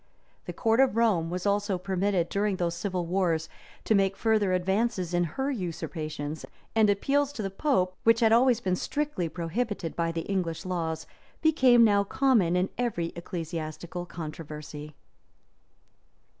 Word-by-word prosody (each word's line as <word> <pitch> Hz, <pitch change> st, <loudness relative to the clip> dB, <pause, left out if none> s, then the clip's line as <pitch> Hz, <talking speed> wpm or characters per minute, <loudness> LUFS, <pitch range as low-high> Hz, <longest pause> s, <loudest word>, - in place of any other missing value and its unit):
The -, -, -4 dB
court 225 Hz, 0 st, +1 dB
of 265 Hz, -5 st, +4 dB
Rome 200 Hz, -8 st, +2 dB
was 180 Hz, +2 st, -4 dB
also 200 Hz, -1 st, +1 dB
permitted, 185 Hz, -1 st, 0 dB
during 205 Hz, 0 st, 0 dB
those 175 Hz, -2 st, -1 dB
civil 180 Hz, 0 st, -2 dB
wars, 170 Hz, -3 st, 0 dB, 0.4 s
to -, -, +2 dB
make 195 Hz, -1 st, +2 dB
further 215 Hz, -4 st, +2 dB
advances 190 Hz, 0 st, 0 dB
in 175 Hz, 0 st, +2 dB
her 265 Hz, -, -2 dB
usurpations; 155 Hz, -, -4 dB, 0.3 s
and 220 Hz, -2 st, +5 dB
appeals 280 Hz, +8 st, +1 dB
to 220 Hz, -, -4 dB
the 195 Hz, -, -3 dB
pope, 185 Hz, -6 st, +1 dB
which 230 Hz, 0 st, +5 dB
had 225 Hz, -1 st, +5 dB
always 240 Hz, 0 st, +5 dB
been 185 Hz, -3 st, 0 dB
strictly 285 Hz, -, -2 dB
prohibited 175 Hz, +1 st, -3 dB
by 165 Hz, -1 st, 0 dB
the 165 Hz, 0 st, -3 dB
English 180 Hz, -3 st, -2 dB
laws, 160 Hz, -3 st, -2 dB, 0.4 s
became 260 Hz, -7 st, +5 dB
now 205 Hz, -2 st, +4 dB
common 205 Hz, -6 st, +2 dB
in 180 Hz, +1 st, +1 dB
every 195 Hz, -9 st, -1 dB
ecclesiastical 170 Hz, 0 st, -5 dB
controversy. 150 Hz, -2 st, -8 dB
185 Hz, 145 wpm, -28 LUFS, 170-220 Hz, 0.4 s, and